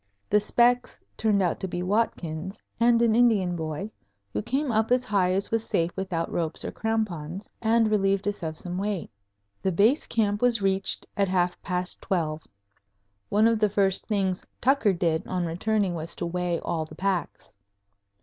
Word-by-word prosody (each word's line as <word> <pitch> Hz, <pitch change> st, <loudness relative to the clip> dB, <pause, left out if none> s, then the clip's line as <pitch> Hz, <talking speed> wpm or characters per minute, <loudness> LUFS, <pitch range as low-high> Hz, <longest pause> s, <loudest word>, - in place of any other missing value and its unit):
The 210 Hz, -, +6 dB
"specks" 245 Hz, +3 st, +2 dB, 0.2 s
turned 210 Hz, -3 st, +2 dB
out 175 Hz, -, 0 dB
to 190 Hz, -, -3 dB
be 175 Hz, 0 st, -3 dB
Watkins 185 Hz, -3 st, -1 dB, 0.2 s
and 235 Hz, 0 st, +5 dB
an 230 Hz, -2 st, +4 dB
Indian 215 Hz, -7 st, +3 dB
boy, 160 Hz, +5 st, -4 dB, 0.4 s
who 105 Hz, -, -1 dB
came 270 Hz, -, -1 dB
up 220 Hz, 0 st, +1 dB
as 250 Hz, 0 st, +3 dB
high 190 Hz, -3 st, +2 dB
as 195 Hz, +1 st, -1 dB
was 225 Hz, 0 st, +1 dB
safe 170 Hz, -5 st, 0 dB
without 185 Hz, -4 st, -2 dB
ropes 165 Hz, -2 st, -2 dB
or -, -, -3 dB
crampons, 195 Hz, -5 st, -3 dB
and 225 Hz, -1 st, +3 dB
relieved 195 Hz, -1 st, +1 dB
us 205 Hz, -1 st, -2 dB
of 160 Hz, -2 st, -4 dB
some 180 Hz, 0 st, -5 dB
weight. 200 Hz, -3 st, -3 dB, 0.5 s
The 190 Hz, -, +1 dB
Base 215 Hz, -, +3 dB
Camp 205 Hz, -2 st, 0 dB
was 245 Hz, -2 st, +3 dB
reached 195 Hz, -1 st, 0 dB
at 200 Hz, -1 st, +2 dB
half 180 Hz, -1 st, 0 dB
past 180 Hz, -1 st, -2 dB
twelve. 160 Hz, -4 st, -1 dB, 0.9 s
One 210 Hz, +2 st, +3 dB
of 230 Hz, -1 st, +3 dB
the 210 Hz, -1 st, +3 dB
first 195 Hz, -1 st, +1 dB
things 190 Hz, -4 st, 0 dB, 0.2 s
Tucker 255 Hz, -6 st, +3 dB
did 165 Hz, -2 st, 0 dB
on 180 Hz, -1 st, -1 dB
returning 195 Hz, +3 st, 0 dB
was 165 Hz, 0 st, -3 dB
to -, -, -3 dB
weigh 175 Hz, 0 st, -1 dB
all 165 Hz, -2 st, -2 dB
the 155 Hz, -, -11 dB
packs. 190 Hz, -2 st, -2 dB
195 Hz, 175 wpm, -26 LUFS, 175-220 Hz, 0.9 s, The